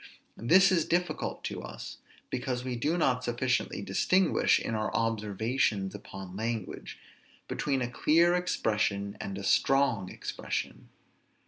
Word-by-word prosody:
This 185 - +5
is 170 -4 +3
difficult 175 -2 -1
to - - -4
us, 60 0 -8 0.3
because 125 -1 -2
we 125 -1 -3
do 150 +9 0
not 130 -6 +2
sufficiently 120 -3 -1
distinguish, 180 - +3
in - - -3
our 110 -1 -1
observations 110 -2 0
upon 95 -1 -9
language, 110 -1 -4 0.5
between 135 -3 -1
a - - -1
clear 165 +8 +3
expression 105 - 0
and 100 -1 -5
a 100 - -6
strong 120 -3 +2
expression. - - -5
120 Hz, 125 wpm, -29 LUFS, 100-145 Hz, 0.5 s, This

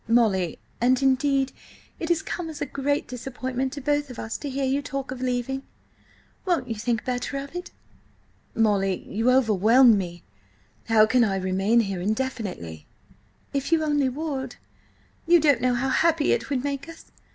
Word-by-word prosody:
"Molly—" 210 -7 +2 0.2
"And, 250 +1 +4
indeed, 270 0 +2 0.5
it 330 - -4
has 340 -2 +2
come 345 -2 -4
as 305 -2 -8
a - - -1
great 285 +1 -1
disappointment 255 +1 -4
to 285 - -6
both 290 +1 0
of 250 - -9
us 220 - -5
to 290 - -5
hear 270 0 -1
you 270 +2 +1
talk 275 -2 -5
of 255 -1 -6
leaving. 255 +1 -1 0.8
Won't 340 -9 0
you 230 - -2
think 225 +1 -2
better 250 +2 -2
of 280 +4 -7
it?" 355 0 -5 0.9
"Molly, 200 -4 +1
you 225 +4 0
overwhelm 230 -1 +5
me.... 175 -2 -6 0.6
How 220 -2 +5
can 245 +2 +3
I 200 -4 +1
remain 195 +5 +2
here 195 -4 -3
indefinitely?" 205 - -3 0.7
"If 280 +2 -2
only 300 -3 +2
you 260 - 0
would! 270 -4 -4 0.7
You 345 0 +7
don't 285 -6 +3
know 250 0 +2
how 265 +2 0
happy 320 +2 +2
it - - 0
would 265 -3 -1
make 285 +2 -3
us. 330 - -13
255 Hz, 170 wpm, -25 LUFS, 225-280 Hz, 0.9 s, You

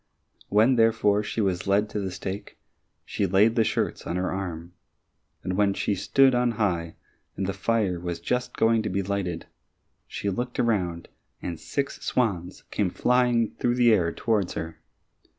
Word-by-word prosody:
When, 110 +5 +4
therefore, 115 -2 +3
she 110 +1 -3
was 95 -2 -1
led 100 +2 +3
to 105 - -2
the 95 -2 -2
stake, 95 +2 -6 0.5
she 100 - -1
laid 105 +5 +4
the 115 - +4
shirts - - -2
on 85 - -2
her 90 0 -1
arm, 85 -3 -5 0.7
and 90 - -2
when 100 0 +2
she 105 - 0
stood 130 +7 +3
on 120 -1 +2
high 85 -7 -1 0.4
and 95 - -1
the 95 - -2
fire 100 -2 0
was 85 -1 -4
just 125 +8 -2
going 115 0 +3
to 110 - -3
be 100 +1 -1
lighted, 90 -4 -3 0.6
she 100 - -3
looked 125 +6 -4
around 90 -8 0 0.3
and 85 -3 -5
six 140 - -3
swans 95 -7 -1
came 100 -3 0
flying 120 +2 +2
through 120 0 +1
the 120 -2 +5
air 85 -5 +2
towards 105 -1 0
her. 80 0 -5
100 Hz, 170 wpm, -26 LUFS, 90-115 Hz, 0.7 s, the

